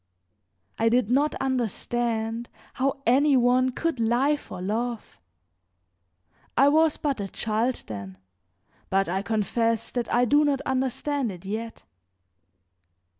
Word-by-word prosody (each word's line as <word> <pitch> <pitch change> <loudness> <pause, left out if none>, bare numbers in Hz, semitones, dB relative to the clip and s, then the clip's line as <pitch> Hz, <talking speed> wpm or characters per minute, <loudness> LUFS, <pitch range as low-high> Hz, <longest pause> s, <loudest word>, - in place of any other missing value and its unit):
I 225 +1 +4
did 240 -1 +2
not 285 +4 +2
understand 235 -2 -2 0.2
how 275 +1 -1
any 275 +3 +4
one 250 +1 +3
could 325 0 -2
lie 240 +6 +2
for 290 - -9
love; 225 +5 -3 1.4
I 275 - +6
was 315 +1 +3
but 280 -7 -2
a 195 - -3
child 225 +5 -1
then, 100 -3 -7 0.7
but 195 +1 +2
I 190 +3 -1
confess 225 +2 0
that 240 -2 -3
I 245 +1 +3
do 290 +5 +4
not 285 -2 +1
understand 265 0 -1
it 180 0 -11
yet. 225 +3 -5
240 Hz, 125 wpm, -26 LUFS, 220-270 Hz, 1.4 s, I